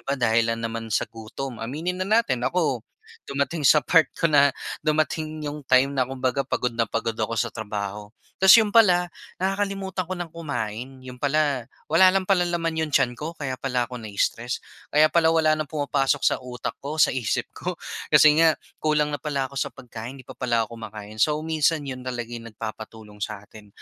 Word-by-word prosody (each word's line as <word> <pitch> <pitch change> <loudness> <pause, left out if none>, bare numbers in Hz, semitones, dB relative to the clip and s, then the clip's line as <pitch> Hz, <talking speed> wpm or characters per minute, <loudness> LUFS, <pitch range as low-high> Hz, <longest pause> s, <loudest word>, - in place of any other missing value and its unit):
ba, 140 - -2
dahil 115 -2 +2
lang 115 0 -2
naman 115 0 -4
sa 110 - +1
gutom, 115 +3 -7
aminin 160 +10 -3
na 185 - -2
natin. 210 - +2
Ako, 135 -1 0 0.5
dumating 140 +2 -1
sa 150 -4 +5
part 160 -2 +4
ko - - -4
na 145 -1 +6 0.3
dumating 155 0 -1
'yong 150 0 -4
time 130 +2 +4
na 130 -2 0
kumbaga 130 0 -1
pagod 125 -2 -1
na 115 -1 0
pagod 115 +1 -1
ako 115 +1 -1
sa 115 +1 0
trabaho, 105 -1 -5 0.3
tas 190 0 +8
'yon 215 -2 +3
pala 180 -6 +5 0.2
nakakalimutan 195 -1 -2
ko 185 - -2
nang 175 -2 -6
kumain, 130 -5 -5
'yon 125 -1 -10
pala 145 -4 +1 0.2
wala 175 +4 +6
lang 190 0 +2
pala 180 -2 +2
naman 165 -1 -1
'yong 160 - -1
tiyan 125 - +3
ko, 155 +7 -7
kaya 130 -3 -4
pala 125 -2 0
ako 125 0 -8
na-stress. 115 +3 -2 0.3
Kaya 155 +1 +4
pala 165 -1 +4
wala 155 -1 +4
nang 155 -1 -1
pumapasok 145 -2 0
sa - - +4
utak 125 -2 -6
ko, 145 +3 -5
sa 155 - +4
isip 125 -5 -1
ko - - -5 0.3
kasi 155 +1 +6
nga 160 -1 +5 0.2
kulang 150 -1 +1
na 145 - -3
pala 140 -2 -2
ako 140 - -15
sa - - 0
pagkain, 120 +1 -9
hindi 130 - -13
pa - - -7
pala 120 -3 +1
ako 110 - -14
kumakain. 110 0 -8
So 150 +4 +3
minsan, 160 -1 +1
'yon 130 -2 -6
talaga 120 -2 -4
'yong 115 -1 -8
nagpapatulong 110 -1 -8
sa 100 -1 -5
atin. 105 0 -15
135 Hz, 195 wpm, -24 LUFS, 115-155 Hz, 0.5 s, tas